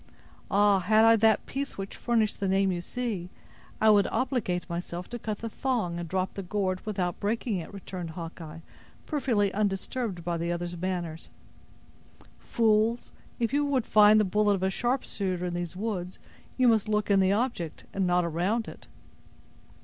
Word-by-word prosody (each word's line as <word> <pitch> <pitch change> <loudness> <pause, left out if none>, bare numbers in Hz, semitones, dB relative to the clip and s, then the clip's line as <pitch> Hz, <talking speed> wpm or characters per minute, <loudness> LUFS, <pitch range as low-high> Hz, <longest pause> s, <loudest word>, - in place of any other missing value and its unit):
"Ah! 200 -1 +4
had 215 +4 +4
I 225 0 +7
that 220 -1 +3
piece 275 +1 -4
which 195 0 -6
furnished 225 -3 0
the 200 - -1
name 195 0 +2
you 180 - -1
use, 215 -6 -4 0.5
I 220 0 +6
would 205 -1 +4
obligate 235 -9 -1
myself 175 0 -5
to 240 - -4
cut 215 -1 -3
the 230 - -5
thong, 220 -8 -2
and 170 -1 -6
drop 185 +1 -1
the 195 - -5
gourd 185 -1 -2
without 185 -4 -2
breaking 215 0 -1
it!" 170 - -6
returned 185 -3 -7
Hawkeye, 165 -1 -8 0.4
perfectly 230 - 0
undisturbed 200 -1 -2
by 170 0 -1
the 170 +1 -2
other's 175 0 -3
manner. 175 -2 -3 1.2
"Fools, 225 0 +1 0.3
if 235 +2 0
you 290 +1 +3
would 275 -5 0
find 215 0 +6
the 210 - +3
bullet 205 +2 +2
of 190 - -4
a 190 - +2
sharpshooter 200 -7 -1
in 175 - -3
these 175 0 -4
woods, 185 -3 -4 0.4
you 255 -1 +4
must 220 -2 +3
look 210 -1 +1
in 195 - +5
the 190 0 +3
object, 210 - -2
and 190 -2 0
not 180 0 +2
around 180 +8 -1
it!" - - -11
200 Hz, 170 wpm, -28 LUFS, 180-225 Hz, 1.2 s, I